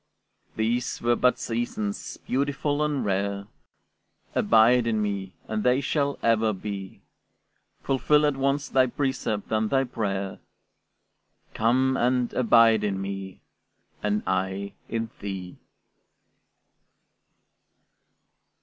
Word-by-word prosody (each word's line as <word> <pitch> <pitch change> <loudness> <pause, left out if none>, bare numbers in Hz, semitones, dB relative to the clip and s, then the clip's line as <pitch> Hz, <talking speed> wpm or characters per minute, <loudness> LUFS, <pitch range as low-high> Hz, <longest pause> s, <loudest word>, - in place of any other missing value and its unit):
These 115 +3 -1
were 120 0 +3
but 125 +1 +3
seasons, 115 -3 -3
beautiful 145 +2 -1
and 150 -2 -1
rare; 100 0 -1 0.9
Abide 115 +2 +4
in 110 -2 +1
me, 100 -3 -2
and 110 0 -2
they 125 +1 +3
shall 140 0 0
ever 110 -1 +3
be. 95 0 -7 0.8
Fulfill 150 +3 +3
at 145 -2 +1
once 140 +1 0
thy 130 -1 +3
precept 130 -5 -2
and 110 0 +1
my 135 -1 +2
prayer, 100 -6 -3 1.1
Come, 130 +4 +2
and 125 0 +1
abide 115 -2 +5
in 100 -2 -1
me, 95 -1 -6 0.6
and 105 0 0
I 95 +1 -2 0.2
in 115 0 -3
thee. 95 -3 -6
115 Hz, 105 wpm, -26 LUFS, 100-130 Hz, 1.1 s, abide